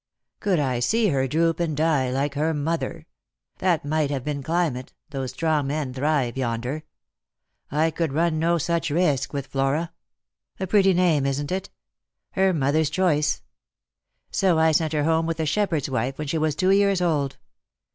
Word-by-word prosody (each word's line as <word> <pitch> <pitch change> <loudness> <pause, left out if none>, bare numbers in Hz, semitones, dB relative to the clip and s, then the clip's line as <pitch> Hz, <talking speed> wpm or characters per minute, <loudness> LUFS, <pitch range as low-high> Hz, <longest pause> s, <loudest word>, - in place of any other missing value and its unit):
" - - -58
Could 195 -5 +1
I 130 -4 0
see 220 - +2
her 135 -3 +1
droop 165 +4 +1
and 160 -4 -1
die 150 -5 +2
like 140 +3 -1
her 155 +3 0
mother. 165 +2 -2 0.5
That 175 -5 +1
might 155 0 0
have 135 -3 -3
been 145 0 -3
climate, 155 -4 -1 0.2
though 135 -2 -3
strong 155 0 0
men 140 -2 -2
thrive 135 -2 0
yonder. 125 +4 -2 0.9
I 155 +3 +1
could 160 -1 -1
Lost - - -7
for - - -2
Love. 165 - +3
13 - - -4
run 155 - -1
no 170 +2 +2
such 170 +1 -1
risk 145 -4 +1
with 140 -2 -3
Flora 140 +5 -1 0.3
— - - -44
a 190 - -1
pretty 195 0 +4
name, 165 -6 +3
isn't 140 +3 -2
it? 190 +1 -3 0.6
her 190 0 +2
mother's 150 -1 +1
choice; 155 -3 +1 0.9
so 185 -4 +2
I 160 0 +4
sent 155 0 +1
her 150 -1 +1
home 160 +1 +2
with 165 0 -3
a 160 - 0
shepherd's 165 -3 0
wife, 130 0 -2
when 155 - -4
she 155 +3 -1
was 155 -1 0
two 185 +3 +2
years 200 -1 +3
old. 150 -6 0
155 Hz, 190 wpm, -24 LUFS, 140-170 Hz, 0.9 s, pretty